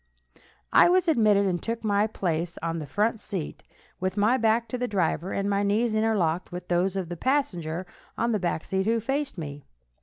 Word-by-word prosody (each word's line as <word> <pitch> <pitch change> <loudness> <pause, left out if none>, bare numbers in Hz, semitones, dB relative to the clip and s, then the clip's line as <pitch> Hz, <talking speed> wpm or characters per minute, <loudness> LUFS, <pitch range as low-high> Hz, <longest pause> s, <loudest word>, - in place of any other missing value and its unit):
I - - +7
was 370 0 +3
admitted, 215 -9 +4
and 180 -3 0
took 230 0 -4
my 205 0 +2
place 170 -5 -2
on 165 0 -1
the 150 - -6
front 210 +8 0
seat, 185 -7 -5 0.4
with 185 +2 -2
my 215 +5 +4
back 230 -1 +2
to 250 - -3
the 250 - -1
driver, 185 -3 0
and 200 0 -1
my 200 0 +1
knees 215 +3 +1
interlocked 200 -7 +1
with 180 0 -7
those 180 +2 +1
of 190 -3 -2
the 175 - -5
passenger 180 - -1 0.3
on 235 +1 +1
the 215 - +1
back 175 -3 -2
seat 190 +1 -1
who 230 +1 +2
faced 275 +2 -2
me. 145 -3 -6
200 Hz, 200 wpm, -26 LUFS, 175-225 Hz, 0.4 s, I